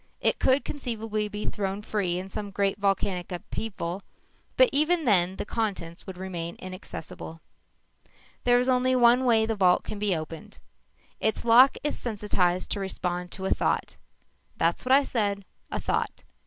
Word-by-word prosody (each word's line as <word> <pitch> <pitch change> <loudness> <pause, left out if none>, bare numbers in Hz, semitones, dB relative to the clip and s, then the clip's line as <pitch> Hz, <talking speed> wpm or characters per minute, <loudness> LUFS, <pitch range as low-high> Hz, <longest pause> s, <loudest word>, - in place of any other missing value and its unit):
It - - +2
could 265 +2 +3
conceivably 225 -6 -3
be 210 0 -5
thrown 200 0 -3
free 190 -5 -1
in 185 +1 -5
some 205 +1 -5
great 200 0 0
volcanic 195 -2 0
upheaval 180 0 -4 0.6
but - - +7
even 315 +2 +3
then 185 -4 +3
the - - -4
contents 195 -7 -3
would 190 -2 -7
remain 175 -2 -5
inaccessible._ 180 -3 -11 0.3
"_There 245 0 +5
is 250 - 0
only 255 0 +3
one 245 +1 +5
way 225 -3 +4
the 225 - -1
vault 185 -4 +3
can 210 - -6
be 205 -3 +1
opened. 165 +6 -7 0.6
Its 220 +1 -1
lock 245 +3 +7
is 295 - -2
sensitized 200 -5 0
to - - 0
respond 180 -2 -3
to 190 - -6
a - - -1
thought. - - 0 0.6
That's 165 +1 +1
what 255 - 0
I 275 +2 +7
said 205 -6 -1 0.2
a - - -3
thought. - - -2
205 Hz, 160 wpm, -27 LUFS, 185-235 Hz, 0.6 s, but